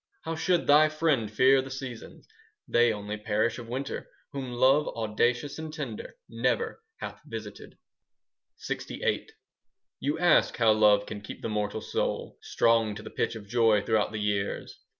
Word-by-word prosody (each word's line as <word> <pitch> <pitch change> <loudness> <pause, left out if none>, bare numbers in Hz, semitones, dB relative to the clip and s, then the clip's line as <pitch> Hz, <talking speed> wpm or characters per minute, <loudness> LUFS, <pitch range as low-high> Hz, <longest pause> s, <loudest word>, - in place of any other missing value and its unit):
How 165 0 -3
should 170 +2 +1
thy 150 +2 +6
friend 155 -8 +1
fear 130 +5 +5
the 135 - -8
seasons? 130 -3 -8 0.4
They 120 0 +4
only 105 0 -4
perish 110 +3 0
of 120 - -9
winter 135 +3 -4 0.2
10 140 - -4
Whom 130 -2 -6
Love, 135 +5 +4
audacious 120 +6 -1
and 160 -1 -6
tender, 135 -8 -6
Never 460 -1 -1 0.2
hath - - -7
visited. - - -9 0.9
LXVIII 485 - -2 0.7
You 145 +2 -1
ask 175 -1 +3
how 115 -2 +5
love 105 -1 +4
can 105 - -7
keep 105 - -9
the - - -2
mortal 105 0 -2
soul - - -3
Strong 115 -2 +2
to 105 - -8
the - - -9
pitch - - -1
of 105 -3 -9
joy 110 -2 +3
throughout 110 -1 +1
the 110 - -4
years. 105 -1 -2
120 Hz, 160 wpm, -28 LUFS, 105-140 Hz, 0.9 s, thy